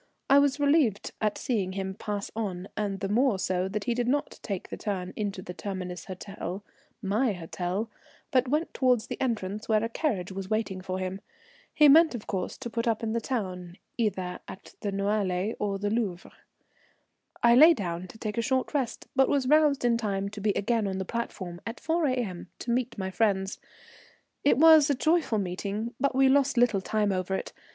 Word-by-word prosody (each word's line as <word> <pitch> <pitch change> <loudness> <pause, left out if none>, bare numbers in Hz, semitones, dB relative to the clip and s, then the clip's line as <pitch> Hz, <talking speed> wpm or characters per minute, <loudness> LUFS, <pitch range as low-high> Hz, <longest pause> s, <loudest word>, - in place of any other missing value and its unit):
I 280 - +8
was 285 0 +2
relieved 285 -8 +2
at 215 -1 0
seeing 200 -7 -1
him 190 0 -3
pass 205 0 -4
on, 195 -4 -3
and 200 -2 -2
the 195 - -1
more 230 +1 +2
so 185 0 0
that 205 +2 -3
he 240 - 0
did 240 0 -1
not 285 +3 -1
take 195 -4 -5
the - - -4
turn 185 -3 -4
into 200 -3 -3
the 180 - -7
Terminus 180 -3 -5
Hotel, 190 0 -6 0.4
my 215 +4 +1
hotel, 180 +4 -3 0.4
but 255 0 +3
went 300 +5 0
towards 250 -4 +2
the - - -6
entrance 215 -4 -2
where 215 0 +3
a - - +1
carriage 210 - -1
was 190 0 -6
waiting 215 -4 -1
for 185 0 -4
him. 185 +1 -4 0.5
He 300 - +6
meant 315 0 +7
of 220 - -6
course 190 -3 -3
to 255 -3 -6
put 230 +1 -2
up 225 0 0
in 220 -1 -1
the 230 - 0
town, 185 -8 -4 0.2
either 190 -6 -1
at 190 - -11
the 205 - -2
Noailles 200 0 0
or 200 -1 -1
the 205 +1 -2
Louvre. 205 -6 -2 1.1
I 235 0 +7
lay 315 +7 +8
down 175 -3 -4
to 200 - -13
take 220 0 -3
a - - +3
short 260 +4 0
rest, 270 -5 -2
but 265 0 +4
was 275 -3 +1
roused 295 -2 +4
in 235 -1 +3
time 200 -3 -2
to 205 0 -8
be 210 - +1
again 225 0 0
on 190 -1 -2
the 190 - -3
platform 185 -6 -5
at 230 +1 -6
4 325 -1 +1
A.M. 230 -10 -2
to 240 - -4
meet 245 -1 -1
my 190 -1 -3
friends. 195 -2 0 0.8
It 285 - +4
was 315 -1 +7
a 285 - +3
joyful 315 -4 +2
meeting, 200 +4 -3
but 280 -2 +1
we 270 0 +5
lost 275 -1 +3
little 235 -5 +3
time 210 +1 0
over 185 0 -1
it. - - -5
210 Hz, 200 wpm, -28 LUFS, 190-250 Hz, 1.1 s, I